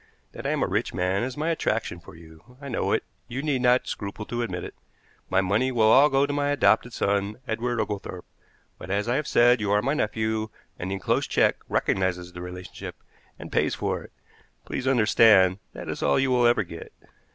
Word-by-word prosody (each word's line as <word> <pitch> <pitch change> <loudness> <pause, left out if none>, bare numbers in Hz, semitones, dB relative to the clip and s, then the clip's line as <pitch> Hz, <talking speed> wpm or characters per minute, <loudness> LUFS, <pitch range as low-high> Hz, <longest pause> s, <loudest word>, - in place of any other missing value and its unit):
That - - -6
I - - 0
am - - 0
a - - +1
rich - - -2
man 95 +1 0
is 130 +2 -4
my 160 +3 0
attraction 110 - -1
for 85 -1 -14
you. 80 +9 -17
I 140 -1 -8
know 100 -5 -1
it; - - +1 0.2
you 125 +3 -4
need 140 -4 0
not 125 0 +3
scruple 100 +1 -5
to 120 +2 -3
admit 90 -6 -3
it. - - -7 0.6
My 95 +1 +3
money 105 +8 +1
will 110 -3 +4
all 140 +5 +7
go 135 0 +3
to 145 - -3
my 145 0 0
adopted 125 -4 +3
son, 100 -1 -1
Edward 120 +1 -2
Oglethorpe; 100 -4 -4 0.5
but, 90 - -9
as 100 +3 -1
I 120 - +1
have 150 - -2
said, 120 -1 +4
you 105 - -1
are 105 0 +3
my 135 +3 +1
nephew, 110 -4 -1 0.3
and 90 - -4
the 95 - -2
enclosed 95 - -1
check - - +3
recognizes 90 -2 -1
the 90 - -8
relationship, 90 0 -8 0.4
and - - -10
pays - - +1
for - - -2
it. - - -13 0.5
Please 135 - -4
understand 105 -6 +5
that - - -8
it - - -2
is - - -6
all 70 - +2
you 135 -1 +2
will 125 -1 +4
ever 120 -3 +3
get." 85 -2 -10
110 Hz, 215 wpm, -25 LUFS, 95-125 Hz, 0.6 s, all